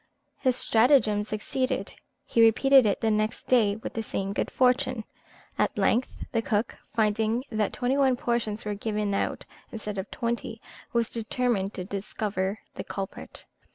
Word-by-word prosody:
His 255 -2 +2
stratagem 225 -4 +4
succeeded. 215 +1 -2 0.3
He 230 - +2
repeated 255 +2 +6
it 200 - 0
the 225 - +2
next 215 +1 0
day 220 -5 +4
with 220 - -7
the 225 - -2
same 195 -2 -3
good - - -1
fortune. 255 -2 +2 0.6
At - - +1
length 245 +3 +1 0.2
the 230 - +1
cook, 220 0 -1 0.2
finding 220 +2 +1
that 215 -2 0
twenty 255 +2 0
one 265 -2 +4
portions 235 -4 -2
were 210 - -1
given 210 0 -2
out - - -1 0.3
instead 210 -3 -5
of 190 - -5
twenty, 235 -1 -3 0.3
was 235 -1 0
determined 225 -3 -1
to 185 - -4
discover 200 0 -3 0.2
the - - -6
culprit. 195 -1 -7
220 Hz, 155 wpm, -27 LUFS, 210-245 Hz, 0.6 s, repeated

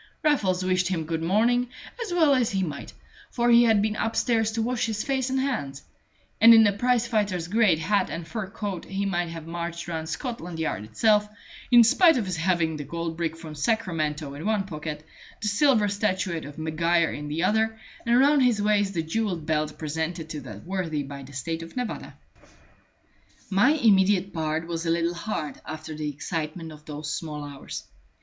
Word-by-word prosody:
Raffles 190 -12 +2
wished 185 -1 +2
him 175 -3 -1
good 160 0 -2
morning, 235 +8 +2 0.3
as 430 - -6
well 320 -5 +4
he 220 -7 +1
might; 150 -5 -5 0.4
for 240 0 +1
he 235 0 +7
had 220 -3 +4
been 215 0 0
upstairs 225 0 +1
to 225 - -1
wash 245 0 0
his 215 -1 -2
face 265 -1 -1
and 265 0 0
hands; 145 - -2 0.6
and 230 +1 +10
in 225 - +8
the 205 - +4
prize 245 +3 +1
fighter's 205 -7 -1
great 205 -3 +3
hat 200 +6 +1
and 165 -1 -5
fur 215 +1 -4
coat 195 -3 -5
he 195 +1 -3
might 175 -3 -1
have 165 -1 -7
marched 170 0 -5
round 160 -2 -4
Scotland 180 - -5
Yard 155 -10 -2
itself, 210 - +2 0.4
in 240 -1 +8
spite 325 - +5
of 225 - -1
his 185 -2 -3
having 165 -2 +1
the 145 - -5
gold 165 +3 -4
brick 165 -1 -2
from 160 -2 -9
Sacramento 155 -6 -1
in 145 +3 -7
one 215 -1 +1
pocket, 155 -4 -6 0.3
the 215 - -3
silver 215 0 +3
statuette 190 -4 -1
of 145 +1 -10
Maguire 165 +1 +1
in 150 0 -6
the 155 +3 -2
other, 220 +3 +1 0.3
and 235 +1 +3
round 285 +1 +5
his 245 -4 +3
waist 205 -2 +1
the 165 - 0
jewelled 175 -1 -2
belt 155 -1 -1
presented 160 +1 -3
to 150 -2 -5
that 105 -6 -10
worthy 170 -5 -2
by 140 0 -8
the 135 +1 -12
State 160 +5 -3
of 165 +8 -10
Nevada. 250 -3 -4 1.3
My 205 +10 +5
immediate 195 - +3
part 160 -1 -1
was 165 -1 -4
a 165 - -2
little 170 +1 +1
hard 170 -5 -4
after 155 +1 -7
the 150 -1 -3
excitement 160 +3 -4
of 150 0 -13
those 150 0 -5
small 150 -3 -5
hours. 140 -1 -7
180 Hz, 190 wpm, -26 LUFS, 160-220 Hz, 1.3 s, and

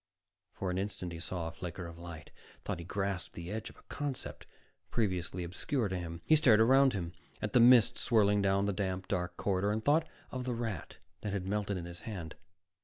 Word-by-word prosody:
_ - - -29
For 95 -2 -1
an 90 - -1
instant, 95 -3 -3
he 85 - -6
saw 85 0 -2
a 80 - -3
flicker 90 +1 -6
of 85 0 -9
light, 85 -2 -9 0.3
thought - - -2
he - - -6
grasped 95 -1 -2
the 85 +2 -6
edge 110 +1 -4
of - - -16
a - - -18
concept 145 -4 -5 0.4
previously 90 -5 -1
obscure 110 - -1
to 95 - -2
him. 85 -1 -5
He 155 - +6
stared 125 -8 +6
around 135 +4 +6
him, 85 -4 -3 0.3
at 105 - -3
the - - +6
mist 120 -1 +7
swirling 105 -4 +4
down 100 0 +2
the 100 - 0
damp, 95 -1 -2
dark 90 -2 -2
corridor, 100 +1 +1
and 110 +1 -2
thought 155 +3 +4 0.2
of 130 0 -3
the 125 -2 -1
rat 115 -8 -4 0.2
that 105 -2 -3
had 95 -2 -2
melted 100 0 -1
in 85 - -5
his 85 0 -8
hand. 85 -5 -6
100 Hz, 215 wpm, -33 LUFS, 90-110 Hz, 0.4 s, mist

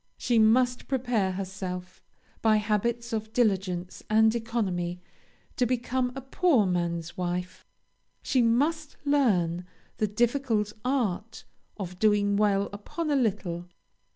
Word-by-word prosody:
She 240 -2 +2
must 245 +3 +3
prepare 245 -8 0
herself, 185 -1 -6 0.4
by 220 -1 +4
habits 225 +3 0
of 220 0 -3
diligence 190 -6 0
and 220 +1 +5
economy, 195 -7 -2 0.6
to 250 - +2
become 250 +1 0
a 270 - -5
poor 270 - +2
man's 170 -2 -2
wife. 180 0 -4 0.6
She 260 - +2
must 290 +7 +1
learn 190 -12 +2 0.3
the 215 - +1
difficult 225 -1 0
art 230 -5 -1 0.3
of 180 -3 -6
doing 205 -1 +3
well 200 -1 +2
upon 300 +10 -4
a - - +3
little. 190 -8 -1
215 Hz, 120 wpm, -27 LUFS, 185-245 Hz, 0.6 s, and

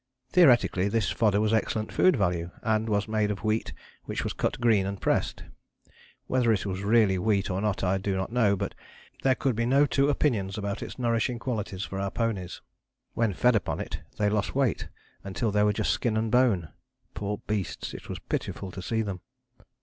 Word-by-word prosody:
Theoretically 120 - +5
this 110 0 0
fodder 105 -3 +2
was 110 +1 +1
excellent 110 0 0
food 185 - +4
value, 90 -6 0
and 110 0 +1
was 105 0 +1
made 110 -1 +1
of 105 0 -4
wheat 110 -4 0 0.3
which - - -3
was - - -2
cut - - -2
green 110 -5 +3
and 100 -1 -4
pressed. - - 0 0.8
Whether 125 -3 +2
it 105 -2 0
was 95 -1 -3
really 100 -2 +3
wheat 100 0 +1
or 95 +1 -1
not 105 -2 -1
I 95 +1 +1
do 95 0 -1
not 95 +3 -3
know, 115 -5 +3
but - - -3 0.5
there 130 -1 +3
could 130 -2 0
be 115 +1 0
no 140 +3 +5
two 140 0 +2
opinions 110 -9 0
about 100 -1 -3
its - - -7
nourishing 120 0 0
qualities 110 -6 -3
for 95 - -5
our 100 0 -1
ponies. 105 -5 -3 0.5
When 115 -2 +1
fed 125 +6 +3
upon 105 - -1
it - - -5 0.2
they 105 - +2
lost 105 +2 0
weight 135 -6 +1 0.4
until 100 +3 -2
they 105 +1 +2
were 105 0 +4
just 105 +1 0
skin 110 -3 0
and 110 0 -1
bone. 115 -10 +3 0.4
Poor 105 +1 -3
beasts! 105 -4 -3
It - - -9
was - - -4
pitiful 95 - -4
to 95 - -7
see 110 +4 -1
them. 95 -4 -5
105 Hz, 195 wpm, -27 LUFS, 100-115 Hz, 0.8 s, Theoretically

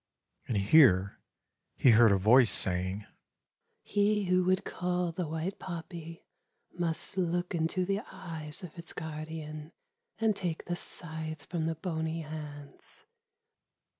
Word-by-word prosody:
And 115 - 0
here 100 - +5 0.6
he 130 - +6
heard 115 -1 +7
a 100 - +4
voice 115 +5 +6
saying: 95 +2 +1 0.8
"He 210 0 +2
who 180 0 +3
would 185 +1 +2
cull 180 -1 -1
the 170 0 -3
white 160 +5 -3
poppy 165 -1 -7 0.5
must 175 +2 -3
look 175 +1 0
into 170 +2 0
the 195 +2 0
eyes 160 -1 -7
of 175 -2 -9
its 165 - -9
guardian 155 0 -6 0.4
and 220 -2 +2
take 175 -4 -3
the 175 - -2
scythe 160 -3 -5
from 165 -3 -2
the 165 - -1
bony 160 -1 -3
hands." 150 -2 -8
160 Hz, 130 wpm, -31 LUFS, 150-180 Hz, 0.8 s, heard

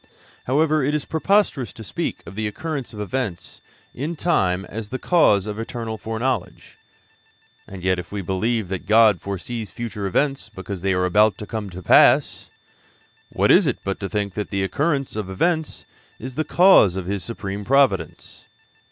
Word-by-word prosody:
However, 155 +3 +2
it 145 +3 0
is 150 - -2
preposterous 160 - +1
to 115 - -10
speak - - -4
of - - -10
the 110 +1 -2
occurrence 140 +4 -5
of 105 - -10
events 105 -3 -4 0.3
in 150 +7 -4
time 95 - 0
as 110 -1 -7
the 130 - -3
cause 115 - +3
of 105 0 -5
eternal 115 -1 -5
foreknowledge. 115 +4 -4 0.9
And 95 -2 -10
yet 95 -1 +1
if 90 - -9
we 100 -1 -4
believe 105 +4 -1
that 95 -1 -5
God 110 -3 +5
foresees 105 +3 -5
future 105 -4 -5
events 135 +5 -1
because 95 -2 -7
they 95 +1 +1
are 90 0 +1
about 105 +2 +3
to 105 - -7
come 105 -2 -5
to 90 0 -9
pass, - - +4 0.8
what - - +2
is - - +5
it - - 0
but 100 0 -3
to 100 - -4
think 100 -3 -2
that 105 +1 -4
the 100 -1 -1
occurrence 140 - -1
of 105 -3 -4
events 160 - -1 0.3
is 130 +3 -7
the 155 - -1
cause 175 - +5
of 95 -2 -4
His 100 0 -3
supreme 100 -3 -5
providence? 115 - 0
110 Hz, 175 wpm, -22 LUFS, 95-130 Hz, 0.9 s, God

